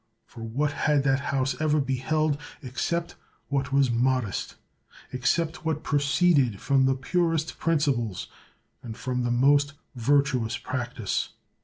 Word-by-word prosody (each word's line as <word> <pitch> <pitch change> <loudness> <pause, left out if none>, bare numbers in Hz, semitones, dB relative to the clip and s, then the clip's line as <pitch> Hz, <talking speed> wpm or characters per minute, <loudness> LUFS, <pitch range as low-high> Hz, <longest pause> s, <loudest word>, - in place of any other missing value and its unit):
For 115 - -12
what 130 +6 -1
had 145 -1 +1
that 135 -1 +2
house 135 -1 -1
ever 155 -1 +2
beheld 145 +3 0 0.2
except 170 +7 -2 0.4
what 140 0 -1
was 135 -2 +3
modest, 120 -3 0 0.6
except 155 +7 0
what 160 -2 -2
proceeded 140 - +2
from 135 -1 +3
the 135 - +2
purest 165 +3 -1
principles 140 - 0 0.6
and 115 -3 -8
from 125 -1 -2
the 120 - 0
most 140 +4 +3 0.2
virtuous 130 -2 +1
practise. - - -3
140 Hz, 125 wpm, -26 LUFS, 125-150 Hz, 0.6 s, was